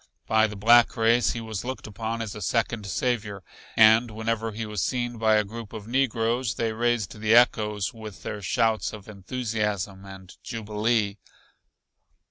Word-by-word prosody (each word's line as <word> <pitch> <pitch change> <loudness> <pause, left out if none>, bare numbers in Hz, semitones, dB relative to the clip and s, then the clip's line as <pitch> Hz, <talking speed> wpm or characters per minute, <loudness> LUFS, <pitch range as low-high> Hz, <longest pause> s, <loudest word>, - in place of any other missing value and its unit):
By 110 0 +3
the 105 - -8
black 120 +5 +5
race 115 +2 +3
he 115 - -5
was 110 -3 -5
looked 130 +1 -5
upon 115 +2 -4
as 110 -2 -6
a 105 - -8
second 115 +1 -1
Savior 105 -3 -2 0.3
and 110 +2 +6
whenever 110 +1 -2
he 110 +2 -5
was 105 -3 -3
seen 120 -2 -2
by 110 -1 +4
a 105 - +3
group 110 +1 -9
of 110 -1 -8
negroes 120 -2 0
they 115 -1 -1
raised 115 -3 -1
the 110 +1 +3
echoes 105 -4 +3
with 110 -3 -10
their 105 - -5
shouts 110 +3 0
of 105 -2 -10
enthusiasm 105 -2 -3
and 95 -1 -12
jubilee. 110 -2 -1
110 Hz, 160 wpm, -26 LUFS, 105-115 Hz, 0.3 s, and